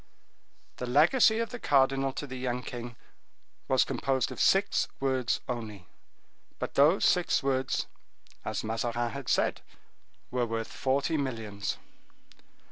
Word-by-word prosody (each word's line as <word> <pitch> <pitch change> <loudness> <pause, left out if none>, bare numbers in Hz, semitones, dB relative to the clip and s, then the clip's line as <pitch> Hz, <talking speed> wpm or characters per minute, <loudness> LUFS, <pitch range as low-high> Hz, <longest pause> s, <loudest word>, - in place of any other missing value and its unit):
The 125 - -4
legacy 175 - +5
of 230 -1 -2
the 245 - -6
cardinal 135 -3 +2
to 145 - -4
the 130 -2 -7
young 125 0 -2
king 120 -1 -7 0.7
was - - +3
composed 130 -2 0
of - - -4
six 195 +1 +3
words 130 -3 0
only, 110 -7 -5 0.7
but - - -4
those 150 +7 +4
six 180 -4 +2
words, 135 -1 0 0.6
as - - -3
Mazarin 115 +2 -1
had 140 -3 -6
said, - - +1 0.7
were 125 -1 0
worth 115 0 -4
forty 140 +4 0
millions. 115 -7 -3
130 Hz, 125 wpm, -29 LUFS, 120-140 Hz, 0.7 s, legacy